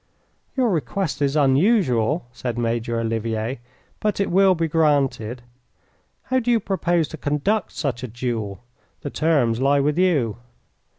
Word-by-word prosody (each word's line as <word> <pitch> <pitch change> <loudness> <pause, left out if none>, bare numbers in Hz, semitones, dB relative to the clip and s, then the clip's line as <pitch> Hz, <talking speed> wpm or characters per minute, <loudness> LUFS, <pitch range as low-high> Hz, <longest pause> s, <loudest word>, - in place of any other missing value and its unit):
"Your 250 -4 +2
request 160 0 -2
is 140 0 +1
unusual," 145 - +2
said 120 -1 -4
Major 115 0 -1
Olivier, 115 +1 -2 0.4
"but 210 -2 -1
it 200 - 0
will 190 0 +5
be 165 -1 0
granted. 140 -7 +1 0.8
How 260 - +1
do 245 -1 -3
you 235 -1 +4
propose 175 -5 0
to 160 - -8
conduct 150 +9 -1
such 130 -5 -3
a 130 - -4
duel? 115 -4 -4 0.4
The 145 - -5
terms 140 -8 +1
lie 140 +1 +3
with 150 +4 +1
you." 145 - +2
140 Hz, 140 wpm, -22 LUFS, 120-175 Hz, 0.8 s, will